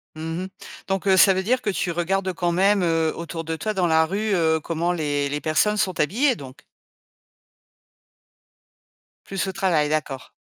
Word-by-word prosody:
Mmh 165 Hz, +3 st, -4 dB
mh. -, -, -6 dB, 0.4 s
Donc, 195 Hz, 0 st, -2 dB
heu, 190 Hz, -1 st, +5 dB
ça 195 Hz, -, +7 dB
veut 190 Hz, 0 st, -1 dB
dire 250 Hz, +5 st, +1 dB
que -, -, -2 dB
tu 180 Hz, -2 st, -1 dB
regardes 185 Hz, +2 st, -1 dB
quand 175 Hz, 0 st, -1 dB
même, 195 Hz, +3 st, +3 dB
heu, 165 Hz, -2 st, +1 dB
autour 165 Hz, 0 st, -6 dB
de 160 Hz, 0 st, -3 dB
toi 215 Hz, +7 st, -3 dB
dans 180 Hz, -3 st, +1 dB
la 160 Hz, 0 st, +4 dB
rue, 205 Hz, +4 st, -2 dB
heu, 160 Hz, -3 st, +2 dB
comment 165 Hz, +2 st, -2 dB
les 145 Hz, -4 st, -1 dB
les 145 Hz, +1 st, -3 dB
personnes 210 Hz, +7 st, +1 dB
sont 185 Hz, -4 st, -1 dB
habillées, 245 Hz, -, +2 dB
donc? 135 Hz, -8 st, -11 dB, 2.7 s
Plus 195 Hz, 0 st, -3 dB
au -, -, -2 dB
travail, 180 Hz, -6 st, +1 dB
d'accord. 145 Hz, -4 st, -3 dB
175 Hz, 180 wpm, -23 LUFS, 160-195 Hz, 2.7 s, ça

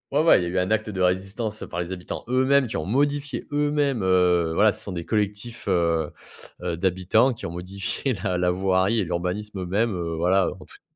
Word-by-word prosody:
Ouais, 140 Hz, -, +2 dB
ouais, 165 Hz, -, +6 dB
il -, -, -2 dB
y -, -, -2 dB
a -, -, -2 dB
eu 90 Hz, +1 st, 0 dB
un 90 Hz, +3 st, -1 dB
acte 110 Hz, 0 st, +1 dB
de 95 Hz, -3 st, -5 dB
résistance, 100 Hz, +4 st, -1 dB
heu, -, -, -9 dB
par 85 Hz, -, -4 dB
les 90 Hz, +1 st, -3 dB
habitants 90 Hz, -1 st, -7 dB
eux-mêmes, 130 Hz, +2 st, +3 dB
qui 110 Hz, -, -6 dB
ont 80 Hz, -, -2 dB
modifié 145 Hz, +5 st, 0 dB
eux-mêmes, 145 Hz, -4 st, +1 dB
heu, 90 Hz, -3 st, +3 dB
voilà, 105 Hz, +5 st, +4 dB
ce -, -, -6 dB
sont 100 Hz, -, -5 dB
des 85 Hz, -2 st, -5 dB
collectifs, 105 Hz, +1 st, -2 dB
heu, 85 Hz, -4 st, +1 dB, 0.5 s
heu, 90 Hz, -1 st, -2 dB
d'habitants 95 Hz, +8 st, +2 dB
qui 115 Hz, -, -9 dB
ont -, -, -4 dB
modifié 95 Hz, +9 st, -3 dB
la 90 Hz, -, -1 dB
la 90 Hz, 0 st, +2 dB
voirie 95 Hz, +4 st, +1 dB
et 100 Hz, -, 0 dB
l'urbanisme 90 Hz, +4 st, -3 dB
eux-mêmes, 100 Hz, +4 st, 0 dB
heu, 85 Hz, -2 st, -3 dB
voilà, 90 Hz, +3 st, +3 dB
heu, -, -, -2 dB
en -, -, -12 dB
toute -, -, -17 dB
95 Hz, 230 wpm, -24 LUFS, 90-115 Hz, 0.5 s, ouais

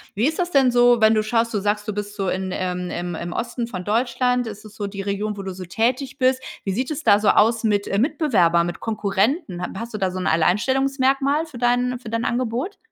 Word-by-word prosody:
Wie 225 Hz, +8 st, +2 dB
ist 320 Hz, -, -6 dB
das 355 Hz, 0 st, -1 dB
denn 270 Hz, -4 st, +4 dB
so, 245 Hz, -1 st, +4 dB
wenn 220 Hz, 0 st, +6 dB
du 215 Hz, -1 st, +2 dB
schaust? 230 Hz, +1 st, 0 dB
Du 210 Hz, -, +1 dB
sagst, 205 Hz, +1 st, -1 dB
du -, -, -1 dB
bist 205 Hz, 0 st, -5 dB
so 195 Hz, -3 st, -1 dB
in, 185 Hz, 0 st, -2 dB
ähm, 180 Hz, -1 st, -3 dB
ähm, 175 Hz, 0 st, -4 dB
im 170 Hz, +1 st, -5 dB
Osten 235 Hz, 0 st, -3 dB
von 185 Hz, -6 st, -6 dB
Deutschland. 245 Hz, +3 st, 0 dB
Ist 210 Hz, 0 st, -8 dB
das 215 Hz, -1 st, -13 dB
so 205 Hz, -2 st, -4 dB
die 195 Hz, 0 st, -6 dB
Region, 205 Hz, +2 st, -2 dB
wo 200 Hz, -, -6 dB
du 190 Hz, -1 st, -5 dB
so 185 Hz, 0 st, -8 dB
tätig 245 Hz, +8 st, -1 dB
bist? 260 Hz, -1 st, +2 dB, 0.2 s
Wie 195 Hz, -, -2 dB
sieht 250 Hz, +7 st, -2 dB
es 305 Hz, 0 st, -4 dB
da 205 Hz, -2 st, +5 dB
so 210 Hz, -, -1 dB
aus 225 Hz, +1 st, +3 dB
mit, 205 Hz, -2 st, +1 dB
äh, 195 Hz, -, 0 dB
Mitbewerbern, 195 Hz, -, +2 dB
mit 175 Hz, -, -5 dB
Konkurrenten? 210 Hz, -, -1 dB
Hat 180 Hz, -, -4 dB
hast 230 Hz, +2 st, -6 dB
du -, -, -3 dB
da 190 Hz, -2 st, 0 dB
so 185 Hz, +1 st, -5 dB
'n 180 Hz, -, -3 dB
Alleinstellungsmerkmal 270 Hz, -, +2 dB
für 290 Hz, -6 st, -11 dB
dein 245 Hz, +1 st, +1 dB
für 240 Hz, -3 st, -9 dB
dein 230 Hz, +1 st, -2 dB
Angebot? 245 Hz, -, -2 dB
220 Hz, 245 wpm, -22 LUFS, 200-250 Hz, 0.2 s, wenn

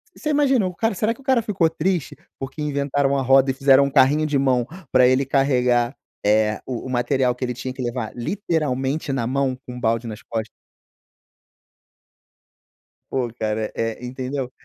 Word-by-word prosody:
Você 305 Hz, -, -4 dB
imaginou 270 Hz, -9 st, +3 dB
o -, -, -18 dB
cara 225 Hz, +3 st, 0 dB
será 215 Hz, +4 st, +1 dB
que 235 Hz, -, -18 dB
o -, -, -18 dB
cara 260 Hz, -3 st, +3 dB
ficou 195 Hz, -7 st, +1 dB
triste 165 Hz, 0 st, -1 dB, 0.2 s
porque 135 Hz, +3 st, -6 dB
inventaram 140 Hz, -1 st, 0 dB
a -, -, 0 dB
roda 135 Hz, +1 st, +4 dB
e -, -, -3 dB
fizeram 135 Hz, 0 st, +5 dB
um -, -, -1 dB
carrinho 140 Hz, +4 st, +4 dB
de 145 Hz, -2 st, +1 dB
mão 130 Hz, -3 st, +2 dB, 0.2 s
pra 125 Hz, -1 st, +6 dB
ele 130 Hz, +2 st, +3 dB
carregar, 125 Hz, -2 st, +2 dB, 0.3 s
eh, 105 Hz, 0 st, +2 dB
o 125 Hz, -3 st, -4 dB
o -, -, -7 dB
material 125 Hz, 0 st, +1 dB
que 125 Hz, -, -6 dB
ele 125 Hz, -, -3 dB
tinha 130 Hz, +1 st, -5 dB
que 130 Hz, -, -7 dB
levar, 120 Hz, -2 st, -3 dB
literalmente 145 Hz, -, -1 dB
na 125 Hz, -4 st, -1 dB
mão, 130 Hz, 0 st, 0 dB
com 125 Hz, -, -7 dB
um -, -, -7 dB
balde 115 Hz, +1 st, 0 dB
nas 110 Hz, +1 st, -7 dB
costas? 110 Hz, -1 st, -4 dB, 2.6 s
Pô, 125 Hz, -3 st, -1 dB
cara, 110 Hz, 0 st, -2 dB
eh, 115 Hz, +2 st, -3 dB
entendeu? 130 Hz, +1 st, -4 dB
135 Hz, 180 wpm, -22 LUFS, 125-145 Hz, 2.6 s, pra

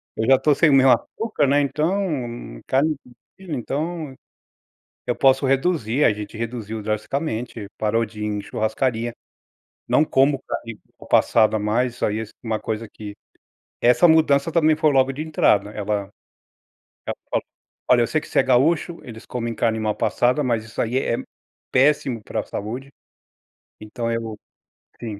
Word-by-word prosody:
Eu 110 Hz, -, -1 dB
já 135 Hz, -, +7 dB
estou 140 Hz, +3 st, +3 dB
sem 155 Hz, +2 st, +4 dB
o -, -, +4 dB
meu 135 Hz, -1 st, +6 dB
açúcar, 215 Hz, -, 0 dB
né, 145 Hz, +2 st, +4 dB
então, 150 Hz, -5 st, -2 dB
carne 150 Hz, +4 st, +2 dB, 0.4 s
vermelha, 175 Hz, -7 st, -5 dB
então, 155 Hz, +2 st, -4 dB, 0.9 s
eu -, -, 0 dB
posso 135 Hz, 0 st, +3 dB
reduzir, 135 Hz, -2 st, +1 dB
a -, -, +5 dB
gente 105 Hz, +1 st, -7 dB
reduziu 110 Hz, -2 st, -5 dB
drasticamente, 110 Hz, 0 st, -3 dB
parou 110 Hz, +2 st, +1 dB
de 110 Hz, -1 st, -11 dB
ir -, -, -2 dB
em 105 Hz, -1 st, -2 dB
churrascaria, 115 Hz, +2 st, -2 dB, 0.7 s
não 155 Hz, -, +3 dB
como 135 Hz, 0 st, +3 dB
carne 115 Hz, -2 st, -5 dB, 0.2 s
mal -, -, -13 dB
passada 110 Hz, -1 st, +4 dB
mais, 115 Hz, +4 st, 0 dB
isso -, -, -1 dB
aí 105 Hz, +1 st, -1 dB
é -, -, -3 dB, 0.2 s
uma 110 Hz, -2 st, -2 dB
coisa 110 Hz, 0 st, -4 dB
que 105 Hz, -1 st, -9 dB, 0.6 s
essa 125 Hz, +9 st, +5 dB
mudança 155 Hz, -2 st, +4 dB
também 155 Hz, -2 st, +3 dB
foi 155 Hz, 0 st, +2 dB
logo 135 Hz, -1 st, +3 dB
de 145 Hz, -, -7 dB
entrada, 105 Hz, -9 st, +2 dB
ela 105 Hz, -1 st, -3 dB, 1.0 s
ela -, -, -3 dB
falou: -, -, 0 dB, 0.4 s
"Olha, 125 Hz, -1 st, +5 dB
eu 115 Hz, -, +2 dB
sei 155 Hz, -, 0 dB
que -, -, -12 dB
você -, -, +1 dB
é -, -, +5 dB
gaúcho, 155 Hz, +7 st, +2 dB
eles 110 Hz, -2 st, -10 dB
comem 120 Hz, -2 st, -3 dB
carne 110 Hz, 0 st, 0 dB
mal 110 Hz, -1 st, 0 dB
passada, 125 Hz, +5 st, +1 dB
mas 115 Hz, -4 st, 0 dB
isso 110 Hz, -, -4 dB
aí 120 Hz, +3 st, -1 dB
é 135 Hz, -, 0 dB
é -, -, -6 dB, 0.5 s
péssimo 130 Hz, -4 st, +2 dB
para -, -, -3 dB
a -, -, -2 dB
saúde", 125 Hz, +7 st, -6 dB, 0.9 s
então, 115 Hz, +2 st, -4 dB
eu 115 Hz, -2 st, -3 dB, 0.6 s
sim, 105 Hz, -4 st, -6 dB
125 Hz, 165 wpm, -22 LUFS, 110-145 Hz, 1.0 s, já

